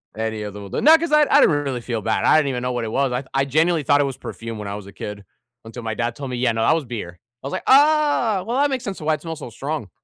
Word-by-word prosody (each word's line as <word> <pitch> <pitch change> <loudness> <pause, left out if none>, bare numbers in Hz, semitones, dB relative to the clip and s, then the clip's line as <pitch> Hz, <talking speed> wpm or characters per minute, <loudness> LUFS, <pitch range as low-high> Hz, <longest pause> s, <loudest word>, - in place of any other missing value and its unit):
Any 110 -1 -3
of 105 -1 -6
them, 100 -1 -9
wel - - -2
not 320 +2 +7
'cause 335 -1 -3
I 300 0 +6
I - - +6
didn't 150 - +4
really 130 -4 -3
feel 115 -2 -3
bad, 110 +2 -1
I - - +5
didn't 150 -3 +2
even 125 -2 -3
know 125 0 -2
what 120 -2 -2
it 110 - -5
was, 135 +2 0
I 125 +2 -2
I 135 0 +2
genuinely 155 +3 +1
thought 145 +1 +3
it - - +2
was 135 -2 -5
perfume 115 -1 -7
when 105 -1 -6
I 100 - -4
was 105 -1 -9
a 100 - -12
kid, 105 -1 -7 0.4
until 115 +2 -9
my 110 -1 -3
dad 120 0 -2
told 135 0 -6
me, 125 - -3
"Yeah, 120 -1 +1
no, 110 - -2
that 115 - +4
was 160 -3 -1
beer." 105 -8 -7 0.2
I - - -4
was - - -6
like, - - -4
"Ah, 285 -8 +4
well, 240 +3 -1
that 285 +1 +3
makes 260 -2 -3
sense 200 -4 -5
to - - -9
why 155 - +2
it 150 - -12
smells 165 -1 -6
so 135 - -8
strong." 135 -1 -5
130 Hz, 330 wpm, -21 LUFS, 115-165 Hz, 0.4 s, not